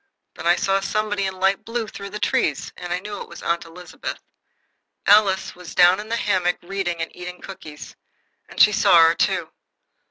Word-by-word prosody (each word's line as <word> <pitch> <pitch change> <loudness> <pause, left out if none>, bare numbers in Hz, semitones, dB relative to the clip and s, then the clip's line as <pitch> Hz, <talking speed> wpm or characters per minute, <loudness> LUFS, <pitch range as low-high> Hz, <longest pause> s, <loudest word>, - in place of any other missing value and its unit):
Then - - -5
I 175 - +5
saw 195 +1 +1
somebody 205 0 -1
in 190 -1 -6
light 195 +1 +1
blue 230 0 -3
through 200 -1 -8
the 210 - -6
trees, 150 -8 -1
and 175 -1 -8
I 175 - +1
knew 205 +2 -7
it - - -9
was - - -11
Aunt 170 0 -1
Elizabeth. 170 +1 -8 0.9
Alice 200 -2 +4
was 180 -1 -11
down 180 +2 +6
in 215 +1 -8
the 230 - 0
hammock 185 -5 +1
reading 175 -2 -3
and - - -9
eating 180 0 -8
cookies, 155 -6 -10 0.5
and - - -10
she 210 - +7
saw 200 -4 +5
her, 165 0 +5
too. - - 0
190 Hz, 190 wpm, -22 LUFS, 175-205 Hz, 0.9 s, she